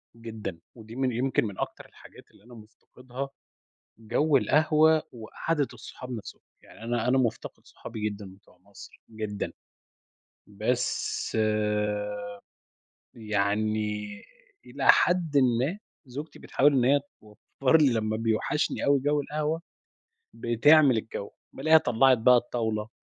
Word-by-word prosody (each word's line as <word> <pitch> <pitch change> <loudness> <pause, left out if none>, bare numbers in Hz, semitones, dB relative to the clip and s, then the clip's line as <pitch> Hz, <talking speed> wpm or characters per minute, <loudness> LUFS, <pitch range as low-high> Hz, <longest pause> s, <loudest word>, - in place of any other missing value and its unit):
جدًا، 110 -6 -7 0.2
ودي 110 -1 -12
من 130 0 0
يمكن 125 +1 0
من 100 -3 -7
أكتر - - -5
الحاجات - - -17
اللي - - -23
أنا 120 +2 -16
مُفتَقِدها 125 +4 -9 0.7
جَوّ 130 +7 +2
القهوة 155 +5 +3
وقعدة 140 +6 -3
الصحاب 125 +2 -10
نفسهم، 115 -4 -8 0.2
يعني - - -15
أنا 120 0 -1
أنا 130 +2 +3
مُفتقِد 115 -3 -2
صحابي 110 -2 -5
جدًا 105 0 -9
بتوع 95 - -25
مصر، 100 +2 -15
جدًا 110 -2 -5 1.0
بس 110 +3 -2 1.8
يعني 105 0 -1 0.6
إلى - - -4
حدٍ 175 -5 +1
ما 130 - +2 0.3
زوجتي 140 +5 -8
بتحاول 145 +2 +2
إن 130 -3 +2
هي 140 +3 +4 0.2
توفّر 110 +7 0
لي 145 -5 +4
لمّا 110 -1 -1
بيوحشني 115 +6 -1
أوي 140 0 +4
جَوّ 145 +2 +1
القهوة، 150 +3 -2 0.7
بتعمل 135 +3 +4
الجَوّ، 105 -2 -5 0.2
بالاقيها 160 +4 +5
طلّعت 130 -1 +3
بقى 125 +3 +5
الطاولة 110 -3 -2
120 Hz, 120 wpm, -27 LUFS, 110-140 Hz, 1.8 s, بالاقيها